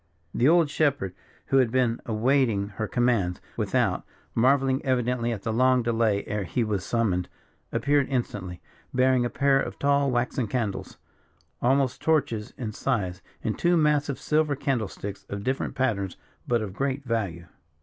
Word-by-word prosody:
The 130 - +3
old 165 -3 +4
shepherd, 140 - +1 0.3
who 135 - +2
had 130 -3 +4
been 120 -1 +1
awaiting 115 -3 +2
her 110 - -1
commands 115 -8 +1 0.2
without, - - 0 0.3
marvelling 135 +2 +3
evidently 125 -2 0
at 105 -4 -4
the 110 - -1
long 130 +1 +3
delay 115 -3 +1
ere 105 -1 -2
he 105 +7 -1
was 105 -4 -1
summoned, 100 -7 0 0.4
appeared 140 -1 +2
instantly, 100 -9 -3 0.3
bearing 130 -1 +3
a - - 0
pair 140 +1 +3
of - - -5
tall 140 0 +2
waxen 120 0 0
candles, 110 -3 -3 0.6
almost 130 0 +2
torches 140 -9 +1
in 115 -4 -4
size, 100 -7 -2 0.2
in - - 0
two 175 0 +2
massive 150 -3 +2
silver 150 +1 +1
candle 135 -6 -1
sticks 100 +1 -7
of 100 0 -5
different 130 +3 -2
patterns, 105 -8 -1 0.3
but 120 -2 +1
of 100 -3 -6
great 135 +4 -2
value. 100 -9 -2
125 Hz, 155 wpm, -26 LUFS, 105-135 Hz, 0.6 s, old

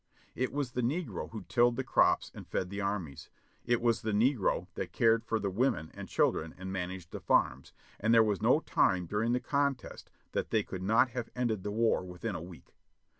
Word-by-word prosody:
It 130 +1 -1
was 140 -3 -2
the 125 - -2
negro 150 +9 -2
who 110 -4 -7
tilled 120 +4 +3
the - - -2
crops - - +2
and - - -10
fed 90 0 -2
the 100 0 -3
armies. 95 -9 -4 0.4
It 120 -1 +2
was 115 -2 +2
the 110 -1 -2
negro 115 0 +2
that - - -5
cared 115 0 +3
for 115 -1 -1
the 100 -2 -2
women 95 - 0
and - - -8
children 80 0 +1
and 95 +1 -6
managed 90 -2 -5
the - - -6
farms; 65 +2 +1 0.3
and 110 +2 +1
there 115 -1 +7
was 105 -4 0
no - - +4
time 90 -1 +2
during 105 +6 0
the 125 - +2
contest 140 -1 -2 0.2
that - - -2
they 110 -2 +2
could 95 -1 -7
not 110 +6 +3
have 120 -1 -4
ended 120 -5 0
the 105 - -4
war 110 -1 +1
within 90 +4 -5
a 80 - -5
week. 85 0 -12
110 Hz, 210 wpm, -31 LUFS, 95-120 Hz, 0.4 s, there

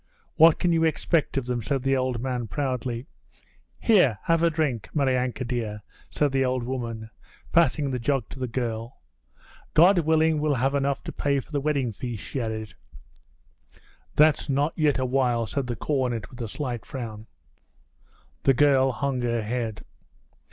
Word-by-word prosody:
'What 165 0 +7
can 175 -1 +1
you 165 0 +2
expect 160 -2 +1
of 135 - -1
them?' 125 -1 -2
said 135 +3 -2
the 135 0 +2
old 130 -2 -1
man 125 -2 -3
proudly. 125 -2 -3 0.7
'Here, 180 - +4
have 165 0 +2
a 170 - +4
drink, 150 -8 -1
Maryanka 130 -3 0
dear!' 110 -4 -3 0.3
said 145 -2 +1
the 135 0 +2
old 130 -1 0
woman, 115 -3 -5 0.4
passing 155 -4 +3
the 125 - -2
jug 125 -1 0
to 135 - -9
the 130 - -2
girl. 115 -1 -4 0.8
'God 180 +3 +6
willing 160 -1 +2
we'll 150 -2 +1
have 135 +3 +1
enough 140 0 0
to - - -5
pay 140 -1 0
for 135 - -11
the 145 -2 -1
wedding 140 -5 0
feast,' 115 0 -6
she 135 - -3
added. 110 -3 -4 1.4
'That's 150 0 +4
not 145 +3 +1
yet 150 -3 +2
awhile,' 125 -2 +1
said 130 +3 -3
the 120 - -2
cornet 125 -6 -2
with 125 -1 -9
a 115 - -3
slight 120 -2 -4
frown. 115 -4 -7 1.1
The 135 - +3
girl 135 -1 +4
hung 135 0 -2
her 120 -2 0
head. 115 -1 -3
130 Hz, 165 wpm, -25 LUFS, 120-145 Hz, 1.4 s, What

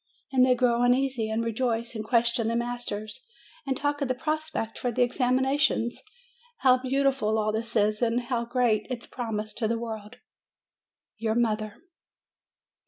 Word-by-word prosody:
And 260 -2 +4
they 255 -1 +5
grow 240 -1 +2
uneasy, 245 -2 +2
and 225 +1 -1
rejoice, 230 +1 -1
and 220 -2 -4
question 235 0 +2
the 230 - 0
masters, 235 -3 -3 0.4
and 265 -1 0
talk 290 0 -1
of 280 - +1
the 255 - 0
prospect 310 -5 -3
for 245 - -1
the 245 +2 +2
examinations. 255 0 +1 0.6
How 255 -1 +5
beautiful 265 -4 +1
all 215 0 +1
this 230 +2 -3
is, 210 0 +2
and 235 +1 +2
how 240 -1 -2
great 235 -3 +1
its 245 -2 -4
promise 215 -3 -4
to 225 0 -1
the 230 +1 0
world! 220 -1 -6 1.0
YOUR 220 -1 0
MOTHER. 215 -3 0
235 Hz, 155 wpm, -27 LUFS, 220-255 Hz, 1.0 s, they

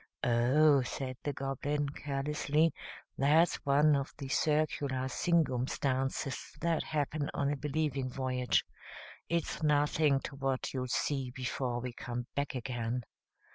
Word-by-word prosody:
"Oh," 130 +5 +5
said 130 0 -4
the 145 - -1
Goblin, 140 +2 -2
carelessly, 150 +2 0 0.5
"that's 155 +5 +4
one 145 +2 +5
of 140 0 -2
the 135 -2 -6
circular 145 -3 +1
singumstances 135 -3 0
that 165 -1 +1
happen 150 -1 -1
on 140 0 +1
a - - 0
Believing 145 -2 -1
Voyage. 125 -2 0 0.6
It's 170 -1 -1
nothing 150 -1 +3
to 140 - -7
what 135 -1 -1
you'll 130 -1 -2
see 135 +1 -1
before 125 -1 -2
we 125 0 -4
come 120 0 -5
back 140 -1 -2
again. 120 -1 -2
140 Hz, 125 wpm, -32 LUFS, 130-150 Hz, 0.6 s, Oh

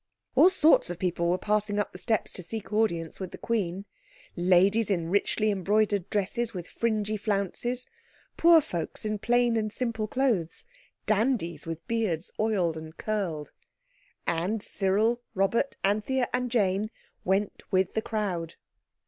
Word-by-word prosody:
All 365 - +7
sorts 320 - +4
of 175 - -4
people 170 -1 0
were 180 - +2
passing 210 +1 0
up 205 - -1
the 180 - -10
steps 220 0 -1
to - - -7
seek 215 +4 -7
audience 170 -6 0
of 185 - -4
the - - -9
Queen. 195 -4 -2 0.5
Ladies 185 +5 +3
in 170 -4 -1
richly 210 +2 +2
embroidered 200 0 +1
dresses 210 +2 -1
with 175 -2 -5
fringy 215 -2 -1
flounces, 215 +5 -1 0.5
poor 335 -1 +7
folks 175 - -5
in 215 -1 -1
plain 240 +1 +2
and 215 -1 0
simple 225 -2 -2
clothes, 225 - 0 0.4
dandies 205 - 0
with 165 0 -6
beards 210 -8 -1
oiled 190 -7 +1
and 160 0 -9
curled. 185 -9 -3 0.7
And 180 +6 -1
Cyril, 215 +5 +1
Robert, 195 +8 +1
Anthea 215 +6 +1
and 250 0 0
Jane, 205 -3 +1 0.3
went 195 +2 0
with 185 -1 +1
the 220 - 0
crowd. 185 -7 -3
205 Hz, 145 wpm, -28 LUFS, 180-225 Hz, 0.7 s, All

